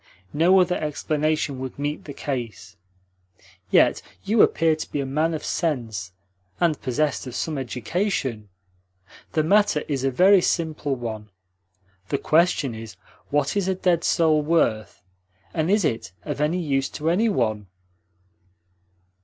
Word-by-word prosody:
No 175 +5 +5
other 180 0 +2
explanation 155 -1 -1
would 130 -1 -6
meet 145 +1 -3
the 145 - -7
case. 115 -9 -5 0.9
Yet - - +4 0.2
you 210 +2 +3
appear 160 -1 +3
to 155 - -7
be 145 - -2
a 140 - -1
man 155 +5 0
of 155 - -6
sense, 115 - -2 0.5
and 170 -3 +1
possessed 135 +2 -1
of 125 - -7
some 160 - -2
education. 130 - -2 0.8
The 155 - +2
matter 200 -3 +3
is 140 -3 -2
a 135 - +2
very 185 +8 +5
simple 155 -5 -1
one. 110 -3 -6 0.8
The - - +1
question 155 -4 +2
is: 110 0 -9 0.3
what 145 +2 0
is 200 -2 0
a 190 - +1
dead 175 -2 +1
soul 160 -4 +3
worth, 145 - 0 0.5
and 160 +2 0
is 205 -2 +3
it 115 - -2
of 145 -1 -4
any 155 +4 +1
use 135 -5 0
to 160 +2 -1
any 220 +6 +2
one?" 110 - -1
150 Hz, 145 wpm, -24 LUFS, 130-170 Hz, 0.9 s, No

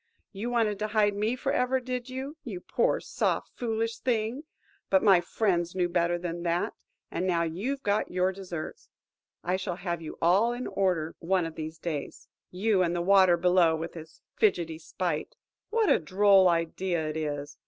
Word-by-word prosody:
You 215 +4 -4
wanted 220 -4 +1
to 215 - -1
hide 210 -1 +2
me 215 +4 0
for 255 - -2
ever, 255 +1 +1
did 250 0 -4
you, 265 +3 -5
you 210 -10 -6
poor, - - +1
soft, - - -1
foolish 230 -1 -2
thing? 240 +3 -1 0.4
But 190 -1 +4
my 195 -5 +6
friends 175 -2 0
knew 180 -1 +2
better 175 0 +1
than 175 0 -4
that, 170 0 0 0.4
and 185 - -1
now 170 -2 +2
you've 210 +13 -3
got 205 +1 +1
your 185 +1 +1
deserts. 180 -4 -7 0.5
I 180 +2 0
shall 185 -2 -3
have 175 -2 -4
you 160 - -8
all 195 +8 +3
in 245 +1 -5
order 180 -5 0
one 180 0 +1
of 165 - -5
these 160 0 -6
days. 155 -4 -5 0.2
You 195 +1 +1
and 175 -1 +1
the 175 - 0
water 185 -2 +5
below, 175 -2 +4
with 165 +1 -5
his 160 -1 -11 0.2
fidgety 170 -7 +1
spite. 165 -1 -3 0.3
What 450 -1 +2
a - - +5
droll 190 +3 +5
idea 170 0 -1
it 155 - -4
is! 145 -2 -4
185 Hz, 180 wpm, -28 LUFS, 170-215 Hz, 0.5 s, my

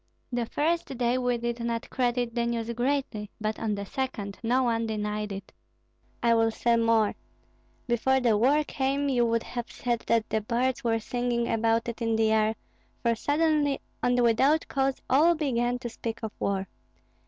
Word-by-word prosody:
The 240 -2 -1
first 310 -2 -1
day 245 +1 +1
we 245 -1 +1
did 235 0 -3
not 235 0 -2
credit 245 -2 0
the 235 0 0
news 235 0 -2
greatly, 245 -4 -1
but 215 0 -2
on 215 -2 -1
the 200 0 -5
second 210 -5 -4
no 250 +3 +2
one 230 -2 0
denied 210 -1 -2
it. 195 0 -7 0.7
I 235 -1 +5
will 225 0 +3
say 235 +1 +1
more; 230 -2 +3 0.7
before 265 +2 +2
the 235 -4 +3
war 275 +8 +3
came, 280 0 -1
you 240 -3 +2
would 230 0 +1
have 240 -1 -6
said 240 -1 -1
that 230 -1 +2
the 220 - 0
birds 245 +4 -1
were 230 -1 +2
singing 240 +1 -1
about 225 +1 +1
it 235 0 -5
in 225 -1 +1
the 220 0 +2
air, 220 0 +2 0.5
for 235 -1 +3
suddenly 290 +2 +1 0.2
and 245 0 +2
without 265 +7 +3
cause 270 -1 0
all 315 +6 +5
began 245 -5 0
to 245 -1 -5
speak 230 0 -6
of 220 - -3
war. 195 -1 -1
235 Hz, 175 wpm, -27 LUFS, 225-255 Hz, 0.7 s, I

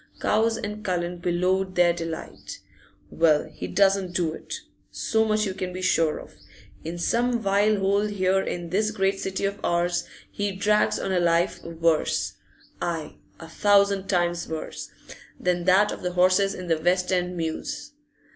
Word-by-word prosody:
Cowes 225 +1 +2
and 210 0 -5
Cullen 175 -2 -2
bellowed 185 +2 0
their 175 -1 +4
delight. 165 -1 -6 0.5
'Well, 155 -3 +3
he - - -6
doesn't 195 -2 +2
do 165 -3 0
it; - - -7 0.3
so 220 -1 0
much 215 0 +1
you 190 - -2
can 185 -1 -4
be 185 +1 -6
sure 165 -4 +2
of. - - -12 0.5
In 165 +2 -5
some 235 +7 +1
vile 205 +1 +2
hole 200 +2 +1
here 190 -2 +1
in 175 -3 -4
this 210 +3 +2
great 195 -2 0
city 190 +1 -2
of 200 +1 -2
ours 175 0 +1 0.3
he 205 -1 -2
drags 210 +2 +2
on 195 - -3
a 185 - +2
life 170 0 +1
worse 165 -1 0 0.5
aye, 165 -3 -3 0.2
a 165 - -9
thousand 200 0 +3
times 175 -2 0
worse! 160 -1 -6 0.5
than 175 -1 0
that 195 +3 +4
of - - -6
the 180 -1 -3
horses 185 +2 +3
in 185 - -7
the 165 -2 +1
West 180 +2 +1
end 180 -1 0
mews. 285 - -4
185 Hz, 165 wpm, -25 LUFS, 175-200 Hz, 0.5 s, their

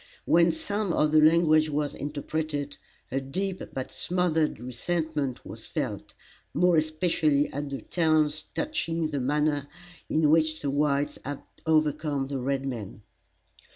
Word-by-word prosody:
When 170 0 +5
some 200 +3 -2
of 150 -1 +2
the 155 0 +6
language 155 -1 +5
was 150 0 -1
interpreted, 145 0 -3 0.4
a 135 +2 0
deep 185 +8 -3
but 130 -1 -5
smothered 170 -7 0
resentment 145 +2 -2
was - - -9
felt; - - -4 0.4
more 180 -1 +4
especially 155 -2 +1
at 145 +1 -3
the 135 - -5
taunts 155 -3 +1
touching 165 - -1
the 145 - -1
manner 145 +1 +1 0.4
in 155 -1 +3
which 155 -1 +2
the 140 - 0
whites 145 0 +1
had 145 0 -5 0.2
overcome 150 -2 +1
the 140 -2 -2
red 135 +1 -1
men. 110 -6 -6
150 Hz, 135 wpm, -27 LUFS, 140-160 Hz, 0.4 s, the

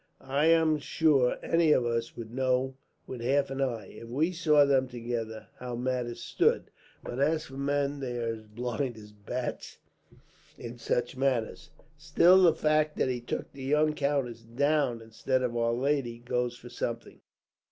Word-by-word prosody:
I 145 +3 +3
am 160 -2 +4
sure 140 -4 +2
any 165 -2 +3
of 125 - +2
us 115 0 -2
would 115 -1 -8
know 130 0 +1 0.3
with 125 -2 -7
half 135 +3 +1
an 135 0 -3
eye, 120 -6 -1
if 115 - -11
we 150 +8 +1
saw 155 -4 +4
them 135 -2 +2
together, 115 -2 -5
how 125 -1 -5
matters 120 -1 -2
stood; - - +1 0.3
but 120 - -5
as 155 +2 +1
for - - -13
men, 140 +1 -1
they 125 -3 -4
are 115 -1 -1
as 110 - -9
blind 120 +3 -3
as 105 -1 -12
bats 110 +5 -5 0.8
in 120 0 -8
such 120 +1 -1
matters. 130 -4 -1 0.3
Still, 170 +5 +5
the 170 -3 +5
fact 155 -1 +1
that - - +1
he 125 -1 -2
took 120 - -5
the 140 - -10
young 150 +3 +2
countess 140 -5 -1
down, 125 0 0
instead 130 +4 -1
of 120 -1 -1
our 115 0 +1
lady, 130 -2 0
goes 120 0 -2
for 120 - -12
something." 120 -1 -5
130 Hz, 170 wpm, -29 LUFS, 120-145 Hz, 0.8 s, Still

